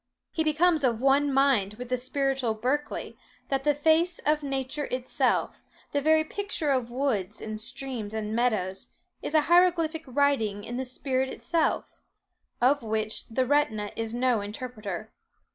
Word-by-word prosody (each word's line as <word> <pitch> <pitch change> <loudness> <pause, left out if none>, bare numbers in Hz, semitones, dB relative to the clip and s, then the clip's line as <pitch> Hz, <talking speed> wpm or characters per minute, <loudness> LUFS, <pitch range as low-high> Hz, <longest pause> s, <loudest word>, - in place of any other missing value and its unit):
He 320 - 0
becomes 315 0 +3
of 235 -4 +2
one 275 +2 +3
mind 265 -7 +3
with 245 +2 -8
the 255 - +2
spiritual 260 -2 0
Berkeley, 260 +7 -2 0.3
that 270 -1 0
the 295 0 +3
face 320 +4 +3
of 300 +1 +3
nature 275 +1 -2
itself, 255 0 0 0.3
the 285 - +1
very 315 +2 +4
picture 330 -3 -2
of 255 -3 0
woods, 235 -6 -1
and 215 0 -5
streams, 230 -3 -4
and 215 0 -3
meadows, 210 -6 0 0.3
is 305 - -3
a 310 - +6
hieroglyphic 335 -1 +3
writing 255 -7 +1
in 240 +3 -5
the 260 - -2
spirit 260 +1 -1
itself, 330 +4 -1 0.6
of 270 +4 +4
which 220 -1 -2
the 255 +3 0
retina 245 -7 +1
is 225 -1 -3
no 245 -2 +1
interpreter. 215 -1 -6
260 Hz, 150 wpm, -27 LUFS, 225-290 Hz, 0.6 s, a